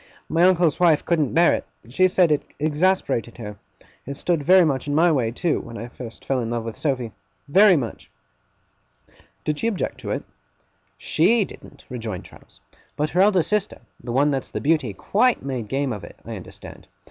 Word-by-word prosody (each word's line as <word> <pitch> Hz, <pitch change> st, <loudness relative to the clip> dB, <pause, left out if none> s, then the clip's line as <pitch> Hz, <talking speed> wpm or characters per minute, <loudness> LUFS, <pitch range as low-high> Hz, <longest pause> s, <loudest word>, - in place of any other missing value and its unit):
My 165 Hz, +2 st, +3 dB
uncle's 175 Hz, -4 st, +3 dB
wife 165 Hz, -4 st, +4 dB
couldn't 155 Hz, -6 st, +1 dB
bear 170 Hz, +1 st, +5 dB
it. -, -, -2 dB, 0.3 s
She 185 Hz, +9 st, +3 dB
said 180 Hz, -3 st, +3 dB
it 150 Hz, -, +2 dB, 0.2 s
exasperated 155 Hz, -5 st, 0 dB
her. 105 Hz, -3 st, -8 dB, 0.5 s
It 140 Hz, 0 st, -5 dB
stood 170 Hz, -1 st, 0 dB
very 180 Hz, +4 st, +6 dB
much 140 Hz, -2 st, -1 dB
in 145 Hz, -, -1 dB
my 170 Hz, +2 st, +4 dB
way, 125 Hz, -7 st, +1 dB
too, 155 Hz, +8 st, -1 dB
when 115 Hz, 0 st, -9 dB
I 120 Hz, -, -7 dB
first 120 Hz, -2 st, -10 dB
fell 135 Hz, -1 st, 0 dB
in 115 Hz, -2 st, -3 dB
love 120 Hz, -1 st, -2 dB
with 115 Hz, -, -5 dB
Sophy. 130 Hz, -6 st, -2 dB, 0.4 s
Very 190 Hz, +5 st, +6 dB
much!' 125 Hz, -7 st, -4 dB, 1.3 s
'Did 150 Hz, -1 st, -2 dB
she 230 Hz, -, 0 dB
object 215 Hz, -5 st, -2 dB
to -, -, -7 dB
it?' -, -, -2 dB, 0.7 s
'SHE 205 Hz, +6 st, +2 dB
didn't,' 140 Hz, -, -14 dB
rejoined 115 Hz, -6 st, -6 dB
Traddles; -, -, -18 dB, 0.4 s
'but 150 Hz, +1 st, -1 dB
her 180 Hz, -, +3 dB
eldest 190 Hz, -3 st, +3 dB
sister 210 Hz, 0 st, -1 dB, 0.2 s
the 120 Hz, -, -5 dB
one 140 Hz, +4 st, +3 dB
that's 135 Hz, -2 st, -2 dB
the -, -, -4 dB
Beauty 150 Hz, -6 st, +1 dB
quite 230 Hz, -, +1 dB
made 125 Hz, -5 st, -3 dB
game 135 Hz, +1 st, -1 dB
of 105 Hz, -, -7 dB
it, -, -, -11 dB
I -, -, -6 dB
understand. -, -, -11 dB
150 Hz, 190 wpm, -23 LUFS, 125-175 Hz, 1.3 s, very